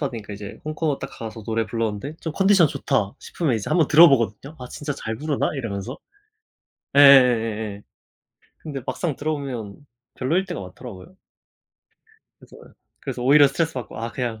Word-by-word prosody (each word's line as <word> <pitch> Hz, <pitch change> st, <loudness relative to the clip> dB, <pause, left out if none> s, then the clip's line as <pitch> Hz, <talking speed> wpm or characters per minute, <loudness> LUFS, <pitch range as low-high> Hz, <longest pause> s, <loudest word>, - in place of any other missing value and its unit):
받으니까 115 Hz, -8 st, -5 dB
이제 100 Hz, 0 st, -8 dB
혼코노 155 Hz, -1 st, -2 dB
딱 -, -, -6 dB
가서 110 Hz, -1 st, -8 dB
노래 115 Hz, +1 st, -1 dB
불렀는데 115 Hz, +5 st, -3 dB
좀 160 Hz, -, -4 dB
컨디션 195 Hz, -1 st, +4 dB
좋다 135 Hz, -8 st, -1 dB
싶으면 155 Hz, -8 st, -2 dB
이제 110 Hz, -3 st, -3 dB
한번 165 Hz, -5 st, +3 dB
들어보거든요 140 Hz, -, +4 dB
'아 125 Hz, -, -8 dB
진짜 145 Hz, +3 st, -5 dB
잘 110 Hz, -4 st, -5 dB
부르나?' 150 Hz, +3 st, -1 dB
이러면서. 115 Hz, -1 st, -5 dB, 1.0 s
예예예예예. 115 Hz, -7 st, +5 dB, 0.8 s
근데 145 Hz, -4 st, -6 dB
막상 145 Hz, +4 st, -2 dB
들어보면 135 Hz, -9 st, -4 dB, 0.4 s
별로일 165 Hz, +9 st, 0 dB
때가 175 Hz, -3 st, -5 dB
많더라고요. 100 Hz, -, -11 dB, 1.2 s
그래서 -, -, -16 dB, 0.4 s
그래서 130 Hz, -3 st, -5 dB
오히려 145 Hz, +3 st, +6 dB
스트레스받고 135 Hz, -4 st, -3 dB
'아 115 Hz, +1 st, -4 dB
그냥 120 Hz, -4 st, -4 dB
130 Hz, 370 characters per minute, -23 LUFS, 110-150 Hz, 1.2 s, 오히려